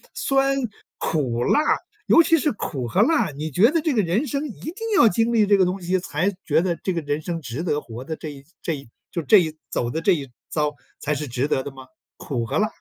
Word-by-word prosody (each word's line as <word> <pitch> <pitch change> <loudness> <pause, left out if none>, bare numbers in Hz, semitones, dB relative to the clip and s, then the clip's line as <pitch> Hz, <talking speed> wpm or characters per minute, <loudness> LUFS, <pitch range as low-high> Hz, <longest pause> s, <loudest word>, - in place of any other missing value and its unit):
酸、 275 0 +2 0.4
苦、 125 -7 -1
辣， - - +4 0.5
尤 335 - +7
其 330 0 +4
是 295 0 +1
苦 130 - -4
和 185 - +2
辣， 320 - +2
你 150 +3 -5
觉 205 - +5
得 330 - +2
这 310 -3 +1
个 220 - +3
人 195 - 0
生 280 +4 -2
一 235 - -10
定 320 - -5 0.2
要 230 - +7
经 225 +4 +2
历 220 -3 +4
这 200 0 +5
个 190 - +4
东 185 +2 -1
西 180 +2 +1
才 180 +3 -1
觉 155 +1 +3
得 175 -2 0
这 190 - 0
个 170 - -1
人 145 +1 -2
生 170 +1 -3
值 135 +1 -5
得 150 -4 0
活 120 -2 -8
的， 160 +3 -4
这 155 - -7
一 140 -1 -12 0.2
这 165 - -1
一 135 -4 -11 0.2
就 170 - -2
这 205 +8 +6
一 160 -3 -1
走 120 - -1
的 160 +7 -2
这 195 +3 +4
一 140 -6 -3 0.2
遭 150 -1 0 0.3
才 150 - -1
是 150 +1 -4
值 125 +3 -1
得 135 - +1
的 140 - -5
吗？ 130 -1 -12 0.3
苦 120 -5 -3
和 140 +6 -2
辣。 215 - +3
165 Hz, 265 characters per minute, -23 LUFS, 145-215 Hz, 0.5 s, 尤